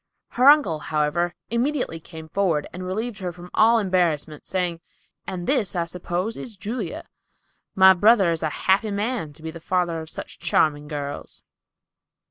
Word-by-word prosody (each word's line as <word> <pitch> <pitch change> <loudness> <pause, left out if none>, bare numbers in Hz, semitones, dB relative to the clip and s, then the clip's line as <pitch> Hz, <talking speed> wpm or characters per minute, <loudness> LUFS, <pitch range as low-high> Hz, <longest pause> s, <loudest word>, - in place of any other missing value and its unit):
Her 255 +3 +5
uncle, 285 - +5
however, 155 +3 0 0.2
immediately 245 - -1
came 160 0 -11
forward, 165 -3 0
and 180 - -6
relieved 215 +5 -3
her 180 -2 -3
from 175 +1 -12
all 230 +2 +5
embarrassment 175 -7 0
by - - -23
saying, 180 -3 -2 0.5
"And 175 -2 -4
this, 210 -9 +1
I 170 -1 0
suppose, 180 +5 -3
is 225 -5 -8
Julia. 205 -2 -5 0.7
My 190 0 +8
brother 200 -1 +5
is 165 - -2
a 155 - 0 0.2
happy 195 +3 +3
man 205 -4 -2
to 155 +2 -15
be 160 - -4
father 170 0 -1
of 160 - -9
such - - -8
charming 150 -1 +1
girls." 145 -1 -6
180 Hz, 160 wpm, -24 LUFS, 160-210 Hz, 0.7 s, My